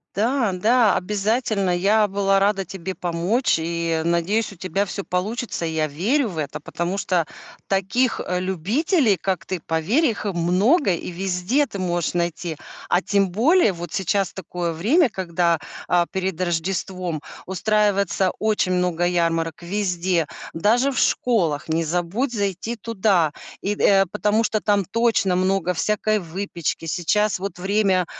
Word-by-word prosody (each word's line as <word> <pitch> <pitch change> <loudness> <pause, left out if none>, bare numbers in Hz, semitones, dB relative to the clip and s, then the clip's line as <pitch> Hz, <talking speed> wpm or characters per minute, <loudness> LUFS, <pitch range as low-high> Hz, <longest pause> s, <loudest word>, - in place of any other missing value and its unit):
Да, 230 +1 +1
да, 220 +4 +3
обязательно. 210 +1 0
Я 210 +4 +3
была 195 0 +2
рада 195 -1 +1
тебе 190 +1 -6
помочь 175 +7 0
и, 165 0 -1
надеюсь, 170 +7 0
у - - -11
тебя 190 +3 -1
всё 200 +1 -5
получится. 200 +3 -3
Я 160 -1 0
верю 220 - 0
в 170 - -8
это, 150 0 -4
потому 170 +5 -3
что 175 -4 0 0.4
таких, 200 +6 +1
э, 180 0 -1
любителей, 210 - +1
как 190 -1 -2
ты, 185 - -3
поверь, 165 - +1
их, 225 -6 -1
э, 205 - 0
много, 190 - +3
и 175 - -5
везде 190 +10 0
ты 205 - -7
можешь 175 -3 -1
найти. 170 -2 -2 0.3
А 180 - +3
тем 200 -1 +1
более 230 - +3
вот 170 -1 -7
сейчас 195 0 0
такое 175 -2 -4
время, 250 - +3
когда, 170 -4 0 0.3
а, 175 -1 +3
перед 190 -2 -2
Рождеством 175 -1 -2 0.2
устраивается 200 -1 +1
очень 215 -4 +1
много 180 -1 +1
ярмарок 165 -2 0
везде, 180 -2 0 0.3
даже 235 +11 +2
в 260 - -5
школах, 170 -12 +1
не 165 +1 +1
забудь 180 - -1
зайти 200 +2 -2
туда 200 -7 +1 0.3
и 205 +2 -1
д - - -3
э, 195 -1 +5
потому 210 +2 +1
что 215 -1 0
там 205 -2 +2
точно 225 -3 +1
много 185 -1 +1
всякой 215 +4 +1
выпечки. 170 -2 -4
Сейчас 190 +6 +1
вот 185 -2 -5
время, 190 -1 +2
190 Hz, 150 wpm, -22 LUFS, 175-210 Hz, 0.4 s, э